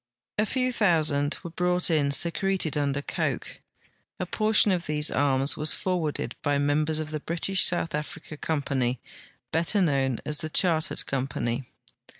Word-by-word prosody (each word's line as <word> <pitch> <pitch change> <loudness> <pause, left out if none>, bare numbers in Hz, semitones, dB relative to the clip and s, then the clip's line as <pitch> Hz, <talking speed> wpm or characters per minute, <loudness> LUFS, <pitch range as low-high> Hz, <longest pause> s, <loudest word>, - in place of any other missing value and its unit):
A 215 - +3
few 255 +1 0
tliousand 155 -9 +2
were 170 - -7
brought 180 +1 +1
in 150 -3 +2
secreted 170 +2 +1
under 145 -1 -1
coke. - - -3 0.6
A - - -1
portion 215 -1 +3
of 180 -2 +1
tliese 150 -1 -1
arms 135 0 +2
was 155 +1 +1
forwarded 175 -5 -2
by 145 0 +1
memlier.s 150 +2 +1
of 155 0 -4
the 155 - -3
British 175 +5 +1
South 175 -1 +1
Africa 155 +1 -5
Com])any, 140 -5 -1 0.6
l)etter 170 +5 +2
known 135 -6 +1
as 150 -1 +3
the 155 - -1
Char 165 0 +3
tered - - -3
Company. 130 -2 -2
155 Hz, 155 wpm, -26 LUFS, 145-175 Hz, 0.6 s, A